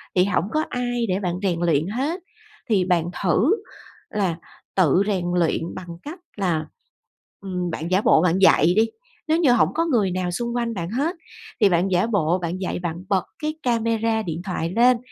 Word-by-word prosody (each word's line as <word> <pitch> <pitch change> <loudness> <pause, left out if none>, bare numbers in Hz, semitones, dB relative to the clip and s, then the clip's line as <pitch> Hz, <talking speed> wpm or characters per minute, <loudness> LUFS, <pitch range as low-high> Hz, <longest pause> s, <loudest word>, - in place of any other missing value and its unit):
thì 180 0 +4
hổng 195 -2 0
có 310 - +1
ai 245 -1 -1
để 185 - +1
bạn 180 -3 -2
rèn 175 -4 0
luyện 165 -1 +2
hết 275 - -2 0.5
thì 195 -5 +3
bạn 175 -2 +1
thử 210 - +3 0.5
là 190 -6 -1 0.4
tự 185 0 +4
rèn 190 -4 0
luyện 165 0 0
bằng 180 - -8 0.2
cách 315 +5 -8 0.2
là, 170 -5 0 0.8
ừm, 180 -3 -3
bạn 165 +2 -4
giả 190 +2 +3
bộ 160 - +5
bạn 180 0 +2
dạy 175 -3 +5
đi. 220 - +5 0.4
Nếu 315 +1 +3
như 300 -7 +4
hổng 220 -9 +4
có 330 - +1
người 220 - +1
nào 180 -1 -2
xung 235 +5 -3
quanh 235 -1 -1
bạn 170 -4 -4
hết 285 +9 -1 0.5
thì 205 - +6
bạn 180 +2 +1
giả 180 +5 +2
bộ 180 -5 +1
bạn 170 +1 -3
dạy, 185 - -2
bạn 170 -2 -3
bật 190 -2 +1
cái 305 0 -2
camera 230 -2 +1
điện 165 -2 -4
thoại 175 -2 -2
lên 245 +1 +5
190 Hz, 195 wpm, -23 LUFS, 175-235 Hz, 0.8 s, thì